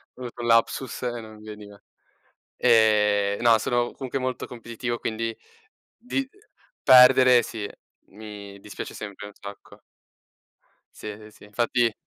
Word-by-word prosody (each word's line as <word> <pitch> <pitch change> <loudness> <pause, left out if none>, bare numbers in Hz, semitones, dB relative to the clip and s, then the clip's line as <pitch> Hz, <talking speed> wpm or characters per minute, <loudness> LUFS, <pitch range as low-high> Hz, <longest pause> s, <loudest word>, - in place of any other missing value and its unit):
ho 130 - -14
avuto 120 -1 -7
un 120 - -3
lapsus 115 +3 +1
e 120 -1 -2
non 110 0 -12
mi 105 - -15
veniva. 105 -1 -11 0.8
Ehm, 105 -3 +3
no 115 -2 +6
sono 120 +1 0
comunque 130 0 -4
molto 130 0 -3
competitivo 120 0 -5
quindi 115 0 -3 0.6
di 260 +3 -3 0.5
perdere 125 -1 +7
sì, 110 -2 -5 0.4
mi 100 -1 -10
dispiace 105 - -8
sempre 105 0 -8
un 105 - -11
sacco. 100 0 -12 1.2
Sì, - - -9
ehm, 105 +1 -8
sì, 105 - -17
infatti 115 +2 +1
115 Hz, 135 wpm, -25 LUFS, 105-120 Hz, 1.2 s, perdere